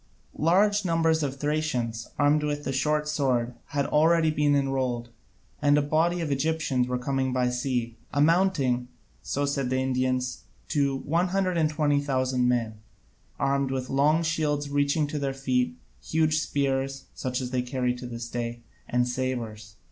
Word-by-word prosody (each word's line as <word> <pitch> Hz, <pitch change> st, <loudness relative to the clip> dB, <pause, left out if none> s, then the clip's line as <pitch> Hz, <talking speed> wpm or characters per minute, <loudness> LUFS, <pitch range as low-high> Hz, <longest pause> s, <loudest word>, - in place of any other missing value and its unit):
Large 205 Hz, +6 st, +3 dB
numbers 165 Hz, -2 st, +2 dB
of 140 Hz, -2 st, -2 dB
Thracians, 135 Hz, -6 st, -1 dB
armed 145 Hz, +1 st, +3 dB
with 145 Hz, 0 st, -2 dB
the 135 Hz, -, -2 dB
short 150 Hz, +3 st, +1 dB
sword, 130 Hz, -5 st, 0 dB
had 140 Hz, -1 st, -1 dB
already 160 Hz, +1 st, +3 dB
been 150 Hz, -1 st, +2 dB
enrolled, 130 Hz, -4 st, -1 dB, 0.5 s
and 145 Hz, 0 st, +4 dB
a -, -, +4 dB
body 165 Hz, +4 st, +1 dB
of 155 Hz, -3 st, -2 dB
Egyptians 140 Hz, -3 st, 0 dB
were 125 Hz, 0 st, -1 dB
coming 130 Hz, +1 st, -1 dB
by 125 Hz, -1 st, +1 dB
sea, 125 Hz, -2 st, -2 dB
amounting 145 Hz, -5 st, +2 dB, 0.3 s
so 145 Hz, +1 st, -1 dB
said 140 Hz, -2 st, -1 dB
the 130 Hz, -, 0 dB
Indians 130 Hz, -1 st, 0 dB, 0.3 s
to 140 Hz, -2 st, +1 dB
120,000 150 Hz, -6 st, +1 dB
men, 115 Hz, -3 st, 0 dB, 0.6 s
armed 140 Hz, 0 st, +1 dB
with 130 Hz, -1 st, -3 dB
long 150 Hz, +4 st, +3 dB
shields 150 Hz, -3 st, -1 dB
reaching 145 Hz, +2 st, +2 dB
to 145 Hz, +1 st, -4 dB
their 135 Hz, -1 st, -2 dB
feet, 125 Hz, -10 st, 0 dB, 0.3 s
huge 155 Hz, -, +2 dB
spears 135 Hz, -2 st, -1 dB
(such 125 Hz, -1 st, -3 dB
as 125 Hz, -1 st, -4 dB
they 130 Hz, -1 st, +1 dB
carry 125 Hz, 0 st, -1 dB
to 125 Hz, 0 st, -7 dB
this 115 Hz, -1 st, -6 dB
day), 120 Hz, 0 st, -4 dB, 0.3 s
and 125 Hz, 0 st, +2 dB
sabres. 115 Hz, -5 st, -4 dB
140 Hz, 150 wpm, -27 LUFS, 125-150 Hz, 0.6 s, and